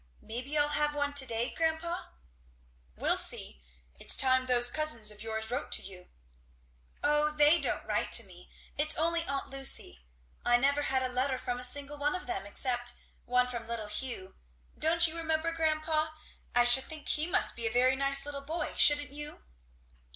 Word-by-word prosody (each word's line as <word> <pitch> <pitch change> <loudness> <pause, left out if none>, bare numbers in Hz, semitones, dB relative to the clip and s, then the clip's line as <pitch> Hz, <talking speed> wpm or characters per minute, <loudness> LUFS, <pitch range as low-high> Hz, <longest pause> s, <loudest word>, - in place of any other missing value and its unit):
Maybe 250 +7 -4
I'll 295 0 +3
have 295 0 0
one 285 0 -3
to 280 -2 +3
day, 235 +1 -3
grandpa?" 330 +1 -3 0.9
"We'll - - +3
see. 65 - +3 0.4
It's - - +6
time 260 -1 +3
those 245 -1 +4
cousins 270 -9 +4
of 210 - -10
yours 220 0 0
wrote 255 +4 -5
to - - +3
you." 180 -2 -10 0.9
"O 295 +1 +1
they 300 +2 +2
don't - - -4
write - - -3
to - - +4
me - - -17 0.3
it's 305 +1 +1
only 335 +1 -2
Aunt 275 -1 -5
Lucy; 270 - +1 0.4
I 240 0 +2
never 280 +3 0
had 265 -2 -1
a - - 0
letter 255 +1 -2
from 245 -1 -6
a - - -8
single 285 +3 0
one 295 +4 -2
of 365 - -8
them, 370 - -4
except 245 +2 -1 0.3
once 250 0 0
from 235 -2 -8
little 225 -3 -6
Hugh, 210 -4 -4 0.4
don't 330 +2 +2
you 320 0 -3
remember, 320 0 -3
grandpa? 310 -1 -1 0.5
I 245 - +4
should 245 +2 +7
think 310 -2 -10
he 305 +2 +1
must 355 - +5
be 230 -1 -2
a - - -4
very 255 +2 +1
nice 275 0 +2
little 285 -1 -8
boy, 310 +3 -6
shouldn't 290 -2 +5
you?" 295 +1 -8
275 Hz, 180 wpm, -28 LUFS, 245-310 Hz, 0.9 s, should